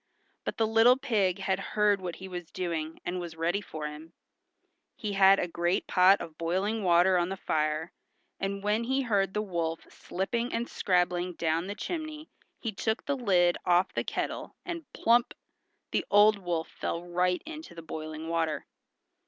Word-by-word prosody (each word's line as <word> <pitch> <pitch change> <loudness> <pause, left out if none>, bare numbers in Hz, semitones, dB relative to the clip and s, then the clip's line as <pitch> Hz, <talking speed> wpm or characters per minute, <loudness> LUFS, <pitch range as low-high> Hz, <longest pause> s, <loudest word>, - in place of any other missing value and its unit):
But - - -3
the 225 - +3
little 225 +3 +5
pig 200 -8 +1
had 190 -1 -1
heard 205 0 +1
what 175 -2 -4
he 190 - -9
was 175 -3 -7
doing, 165 -3 -3
and 180 +1 -2
was 170 -2 -6
ready 170 +5 0
for 155 -6 -6
him. 150 +2 -8 0.8
He 210 -3 -4
had 195 0 +6
a 180 - 0
great 175 +1 0
pot 185 +2 +5
of 155 -1 -9
boiling 190 +6 0
water 180 +1 +5
on 175 +1 0
the 195 - -4
fire, 155 +1 -1 0.5
and 195 0 -3
when 210 +3 +1
he 265 +2 +1
heard 200 -5 +1
the 210 - +1
wolf 170 -4 -2
slipping 230 +7 -3
and 235 +1 -1
scrabbling 180 -1 +1
down 165 +1 0
the 205 - -4
chimney 310 - -5 0.3
he 225 - -3
took 220 +3 -2
the 285 - 0
lid 180 -8 +3
off 180 +2 +3
the - - -1
kettle, - - -4
and 335 -5 -6
plump! 235 +1 +2 0.6
the - - +1
old 205 0 +6
wolf 175 -3 -2
fell 170 - -4
right 180 +1 0
into 315 - -9
the 165 - -9
boiling 155 0 -6
water. 165 -2 -1
185 Hz, 175 wpm, -29 LUFS, 170-215 Hz, 0.8 s, had